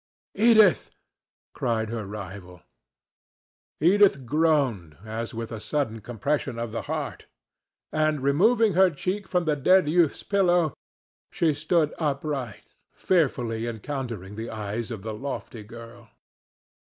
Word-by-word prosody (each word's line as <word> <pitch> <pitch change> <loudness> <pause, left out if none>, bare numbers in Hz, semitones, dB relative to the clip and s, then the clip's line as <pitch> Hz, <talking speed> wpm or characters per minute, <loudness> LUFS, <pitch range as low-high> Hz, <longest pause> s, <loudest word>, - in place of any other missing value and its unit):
"Edith!" 220 -4 +5 0.6
cried 110 -2 -1
her 110 -3 -4
rival. 95 -3 -9 1.2
Edith 180 -5 +4
groaned 130 - +1
as 115 +2 -4
with 115 -1 -6
a 110 - -5
sudden 115 -3 -2
compression 120 +3 -2
of 115 -1 -4
the 115 - -3
heart, - - -4 0.6
and, 155 -3 0
removing 210 - +3
her 190 +2 +5
cheek 185 +6 -3
from 180 -2 0
the 155 -2 +2
dead 180 +4 +4
youth's 165 -1 +2
pillow, 175 -6 +2 0.6
she 160 -3 +1
stood 155 +1 +1
upright, 140 -6 -3 0.2
fearfully 120 -10 0
encountering 115 -4 -5
the 115 +1 -5
eyes 110 +2 -4
of 110 -5 -6
the 110 0 -4
lofty 120 -1 -6
girl. 115 +1 -12
135 Hz, 120 wpm, -26 LUFS, 110-165 Hz, 1.2 s, Edith